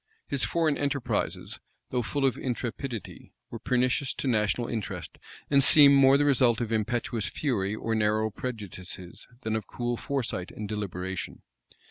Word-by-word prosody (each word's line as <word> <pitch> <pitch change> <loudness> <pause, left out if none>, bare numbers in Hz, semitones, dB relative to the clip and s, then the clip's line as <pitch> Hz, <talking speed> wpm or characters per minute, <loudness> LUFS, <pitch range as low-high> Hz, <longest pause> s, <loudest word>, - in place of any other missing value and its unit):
His 140 -2 0
foreign 160 -4 +1
enterprises, 140 -2 -2 0.3
though 125 - +1
full 135 +4 -1
of 130 - +2
intrepidity, 120 -1 -5 0.2
were - - -6
pernicious 130 +2 0
to - - -3
national 110 0 +1
interest, 110 -5 -5 0.3
and 140 -1 +4
seem 145 -1 +8
more 135 0 +6
the 145 - +2
result 125 -5 +4
of 115 -2 -3
impetuous 115 0 -1
fury 110 -8 -1
or 115 +1 -2
narrow 110 0 +1
prejudices, 95 -6 -7
than 110 -3 -2
of 110 -3 -3
cool 120 -1 -3
foresight 120 -10 -3
and 105 - -7
deliberation. 95 -3 -5
120 Hz, 145 wpm, -27 LUFS, 105-135 Hz, 0.3 s, seem